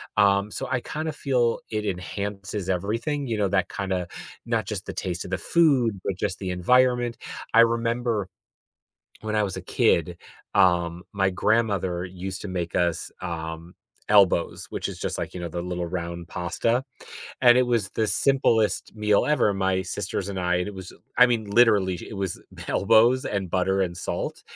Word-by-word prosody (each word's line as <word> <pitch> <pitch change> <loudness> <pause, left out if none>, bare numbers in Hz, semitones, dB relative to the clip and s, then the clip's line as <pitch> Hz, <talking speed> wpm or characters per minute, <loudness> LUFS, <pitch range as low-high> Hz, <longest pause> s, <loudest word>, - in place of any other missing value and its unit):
um, 100 0 +3
so, 95 - -4
I 130 - +1
kind 155 +6 -4
of 155 - -5
feel 125 -5 +1
it 105 -1 -2
enhances 100 +1 -4
everything, 115 - -1
you 115 -2 -1
know, 100 -2 +1
that 95 -1 +1
kinda 95 -3 -2 0.4
not 115 -2 0
just 100 -1 -5
the - - -6
taste 90 -2 -4
of - - -8
the - - 0
food, 130 - +2
but 100 - -1
just - - -2
the 95 -2 -3
environment. 120 +6 +2 0.4
I 115 - +8
remember 115 -3 +1 0.9
when 110 0 -3
I 105 - +3
was 95 -2 -3
a - - -5
kid, - - +1 0.4
um, 85 -1 +3
my 95 -1 +2
grandmother 95 -3 +1
used 95 +1 -6
to - - -6
make 90 -2 -3
us, 85 -2 0
um, 80 +1 -6 0.3
elbows 100 -5 +3
which - - -3
is - - -8
just - - -3
like, - - -4
you 90 - -6
know, 85 - -4
the 85 +1 -4
little 90 0 -3
round 85 0 -5
pasta, 115 +9 -1 0.6
and 120 -1 +7
it 125 - +4
was 115 -6 +1
the 110 - 0
simplest 115 -6 +2
meal 105 -1 +2
ever, 150 -9 +3
my 95 -1 0
sisters 100 -1 -3
and 95 -2 -4
I 90 0 +1
and 90 +1 -1
it 105 - -6
was 95 -2 -9 0.3
I 125 - +9
mean, 115 -3 0
literally, 100 -5 +4
it - - -7
was 95 -2 -3 0.3
elbows 115 +5 +4
and 100 -2 -2
butter 95 +2 +1
and 90 -2 -1
salt, 85 - -4
100 Hz, 180 wpm, -25 LUFS, 90-115 Hz, 0.9 s, I